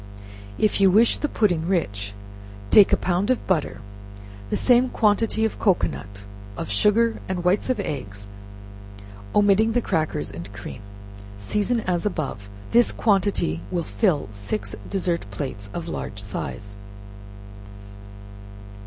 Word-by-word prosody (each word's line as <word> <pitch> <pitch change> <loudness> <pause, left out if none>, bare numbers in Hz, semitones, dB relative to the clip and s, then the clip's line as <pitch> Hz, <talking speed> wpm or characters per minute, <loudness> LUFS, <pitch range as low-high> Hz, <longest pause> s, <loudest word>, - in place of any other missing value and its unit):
If 210 -1 +1
you 195 - +7
wish 220 +5 +4
the 295 - -1
pudding 175 -7 +1
rich, 100 - -1 0.6
take 205 - +7
a - - +4
pound 180 +4 0
of 255 - +1
butter, 150 - -1 0.7
the - - 0
same 250 0 +4
quantity 220 0 +2
of 220 - -3
cocoanut, 100 - -1 0.3
of - - -4
sugar 215 - +3
and 180 -2 -2
whites 180 +7 +1
of 255 - +1
eggs, 100 -8 -5 1.1
omitting 210 +2 +4
the 245 - +3
crackers 155 -1 -1
and 85 +4 -8
cream. 105 +2 -8 0.6
Season 210 - 0
as 180 -4 -1
above. 140 - -3 0.2
This 240 +1 +4
quantity 195 - +1
will 170 - -1
fill 165 - 0
six 100 +1 -4
dessert 175 - -1
plates 100 -2 -6
of 170 +6 -5
large 105 -10 -5
size. 100 0 -5
175 Hz, 125 wpm, -24 LUFS, -, 1.1 s, you